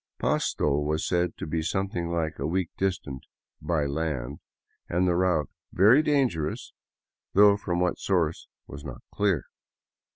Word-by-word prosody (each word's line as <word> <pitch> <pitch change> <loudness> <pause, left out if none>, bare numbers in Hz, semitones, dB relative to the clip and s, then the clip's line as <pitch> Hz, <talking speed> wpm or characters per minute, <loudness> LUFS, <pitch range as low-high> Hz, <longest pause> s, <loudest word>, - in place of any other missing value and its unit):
Pasto 70 -1 +1
was 75 +2 -1
said 90 0 0
to - - -5
be 80 +1 -2
something 90 0 -2
like 80 -2 -2
a 70 - -1
week 90 +1 -1
distant 85 -9 -2 0.2
" - - -52
by 75 -4 +2
land," 70 -4 -3 0.5
and 90 +2 +1
the 90 - +2
route 85 -5 +1
" - - -64
very 120 +9 +7
dangerous," 130 - 0 0.6
though 100 +1 +7
from 90 -4 -2
what 90 0 0
source 85 -5 0 0.2
was 70 - -10
not 60 -2 -8
clear. 100 -8 +1
85 Hz, 155 wpm, -27 LUFS, 75-95 Hz, 0.6 s, very